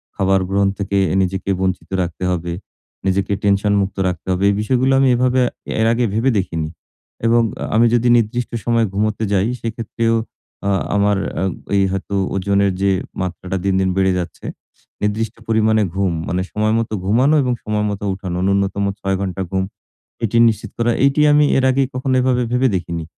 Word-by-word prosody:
খাবার 95 0 +2
গ্রহণ 100 0 +2
থেকে, 100 0 -1 0.2
নিজেকে 95 +1 -2
বঞ্চিত 95 -3 -2
রাখতে 90 +1 -4
হবে। 85 -1 -2 0.5
নিজেকে 95 +1 +1
টেনশন 100 +1 +2
মুক্ত 95 0 -3
রাখতে 90 -1 -4
হবে। 90 +2 0
এই 100 - +1
বিষয়গুলো 130 +4 +1
আমি 135 - +4
এভাবে, 125 +1 +2 0.4
এর 110 - +3
আগে 120 0 +1
ভেবে 115 +5 +2
দেখিনি 80 -5 -2 0.6
এবং 115 +1 +4 0.2
আ - - -2
আমি 115 +2 +5
যদি 120 0 +2
নির্দিষ্ট 120 +2 -1
সময়ে 115 -1 +2
ঘুমোতে 110 +2 -1
যাই, 100 +1 +2
সেক্ষেত্রেও 115 0 -1 0.5
আ - - +2 0.3
আমার 100 0 +2 0.6
এ - - +4
হয়তো 95 +1 -3 0.2
ওজনের 100 +1 +2
যে 100 - +3 0.3
মাত্রাটা, 95 +1 -3
দিন, 95 - +2
দিন 95 0 +1
বেড়ে 95 -1 +3
যাচ্ছে। 85 - -7 0.6
নির্দিষ্ট 105 +2 -1
পরিমাণে 110 -1 +3
ঘুম, 95 -3 +1
মানে 90 +1 -1
সময় 110 +1 0
মতো 110 -1 -3
ঘুমানো 130 +9 +3
এবং 125 - 0
সময়মতো 105 -1 -2
উঠানো, 95 -2 -5
নূন্যতম 100 0 +1
৬ 95 0 -1
ঘন্টা 95 -1 -3
ঘুম। 95 0 0 0.6
এটি 115 +2 0
নিশ্চিত 110 -1 -3
করা। 115 0 +2
এটি 140 +2 +2
আমি 150 0 +5
এর 130 - +1
আগে 135 +1 +2
কখনো 130 +1 -1
এভাবে 125 -1 +1
ভেবে 125 +1 +3
দেখিনি। 85 -2 -4
100 Hz, 170 wpm, -19 LUFS, 95-115 Hz, 0.6 s, আমি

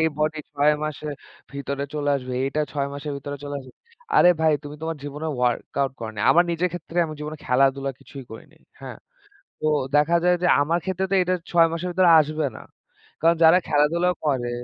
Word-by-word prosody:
এই 160 - +3
বডি 155 +1 0
৬ 145 +1 +3
মাসের 150 0 -5 0.4
ভিতরে 140 0 -4
চলে 145 -1 -1
আসবে। 130 -1 -7
এটা 145 +3 -2
৬ 140 -2 -2
মাসের 145 +1 -5
ভিতরে 145 +1 -6
চলে 145 0 -5
আসবে। 130 -1 -14 0.4
আরে 180 - +7
ভাই, 160 -1 +4
তুমি 145 0 -8
তোমার 165 0 -3
জীবনে 145 +2 -5
ওয়ার্কআউট 125 +2 -1
করনি। 110 -2 -7
আমার 175 - +6
নিজের 170 +2 0
ক্ষেত্রে, 175 0 -5
আমার 155 -1 -8
জীবনে 150 +1 -5
খেলাধুলা 135 +1 +2
কিছুই 135 -2 -11
করিনি, 110 - -12 0.2
হ্যাঁ। - - -9 0.6
তো - - -2 0.3
দেখা 150 +3 +3
যায় 180 0 +4
যে, - - +3
আমার 160 +4 +1
ক্ষেত্রে 190 0 -1
তো - - +3
এটা 180 +1 0 0.2
৬ 170 -1 +5
মাসের 165 +2 -3
ভেতরে 180 0 +4
আসবে 155 0 0
না। - - -9 0.6
কারণ 165 +1 +4
যারা 160 +2 +7
খেলাধুলা 160 +5 +2 0.2
করে 130 -5 0
150 Hz, 190 wpm, -23 LUFS, 140-165 Hz, 0.6 s, আরে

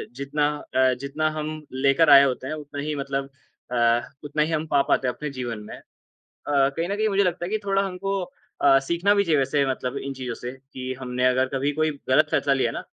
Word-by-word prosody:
जितना 140 +2 0 0.3
अ, 130 0 +4
जितना 150 +3 -1
हम 155 0 -3 0.2
लेकर 140 +4 +3
आए 140 -1 +9
होते 130 -1 -1
हैं 155 - -3
उतना 145 -2 -6
ही 150 +1 -3
मतलब 135 -1 -3 0.4
अ, 120 -1 +3 0.2
उतना 145 +1 -1
ही 155 - -2
हम 155 0 -1
पा 140 -2 +3
पाते 130 - +2
हैं 125 - 0
अपने 150 - -5
जीवन 120 -3 -4
में। - - -7
अ, - - -15 0.7
कहीं 140 +4 +2
न 200 - -1
कहीं 215 +1 +1
मुझे 200 0 +3
लगता 175 -1 -1
है 175 - -5
कि 215 - +1
थोड़ा 195 0 +2
हमको 195 +1 -3 0.4
अ, 135 -1 +6
सीखना 170 +8 +1
भी 200 - +3
चाहिए 160 -5 +2
वैसे 140 +1 +1
मतलब 130 +1 -4
इन 140 0 -5
चीज़ों 125 -3 -5
से 120 - -4 0.2
कि 130 0 -4
हमने 125 0 -1
अगर 130 +1 +2
कभी 135 +2 0
कोई 155 0 +2 0.2
गलत 150 +4 +5
फैसला 140 - +2
लिया 135 - +1
ना, - - -5
140 Hz, 225 wpm, -24 LUFS, 130-155 Hz, 0.7 s, आए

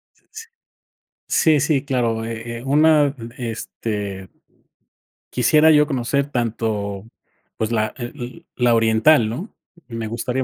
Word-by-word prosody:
S - - -33
s 450 +1 -10 0.8
Sí, 155 -2 +3
sí, 140 -1 +1
claro, 120 -5 0
eh, 115 +1 -6
eh, - - -11
una, 150 0 +4 0.2
este, 105 -4 -5 1.0
quisiera 150 +6 +4
yo 150 -1 +5
conocer 140 0 -1
tanto, 110 -4 -2 0.5
pues, 110 0 -2
la, 110 -2 0
eh 120 -1 -8
o, - - -12
la 120 -1 +5
oriental, 115 +3 +4
¿no? 165 - -6 0.4
Y 115 - -7
me 115 -1 -3
gustaría 125 +3 -2
120 Hz, 130 wpm, -21 LUFS, 110-140 Hz, 1.0 s, yo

